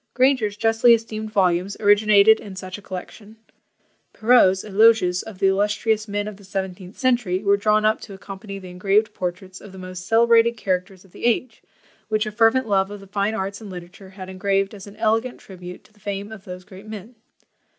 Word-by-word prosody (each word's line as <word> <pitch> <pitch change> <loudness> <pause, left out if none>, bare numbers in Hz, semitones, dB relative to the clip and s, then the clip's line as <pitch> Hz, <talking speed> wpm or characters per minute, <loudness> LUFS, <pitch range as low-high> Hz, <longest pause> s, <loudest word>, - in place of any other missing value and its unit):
Granger's 250 -5 +2
justly 225 +2 +5
esteemed 220 -1 -6
volumes 185 -1 +1
originated 210 +1 +5
in 200 -2 -10
such 185 -1 -7
a - - -15
collection. 200 +3 -9 0.8
Perrault's 215 -5 +4
Eloges 210 -3 +4
of 220 -4 -10
"the 190 - 0
illustrious 210 +3 +1
men 205 0 -3
of 210 -2 -7
the 200 - -17
seventeenth 190 0 -6
century" 235 -7 0
were 200 -1 +4
drawn 215 +1 +2
up 215 +1 +2
to 200 - -10
accompany 195 +1 -9
the 185 -2 -10
engraved 205 +4 +1
portraits 185 0 -6
of 205 - -12
the 190 - -12
most 185 0 -8
celebrated 230 0 +4
characters 185 -1 -3
of 190 - -22
the - - -7
age, 240 0 0 0.5
which 215 0 +1
a 215 - -4
fervent 230 +3 +3
love 195 -2 +1
of 205 0 -8
the 195 - -13
fine 200 +2 -1
arts 200 0 -4
and 210 - -9
literature 185 +1 -10
had 190 0 -14
had 185 - -7
engraved 195 +1 0
as 200 -1 -10
an 200 - -12
elegant 225 +3 0
tribute 180 -2 -11
to 215 - -25
the 210 - -26
fame 200 +1 -5
of 210 -3 -11
those 180 0 -8
great 195 +1 -13
men. 215 +2 -9
205 Hz, 200 wpm, -22 LUFS, 190-220 Hz, 0.8 s, justly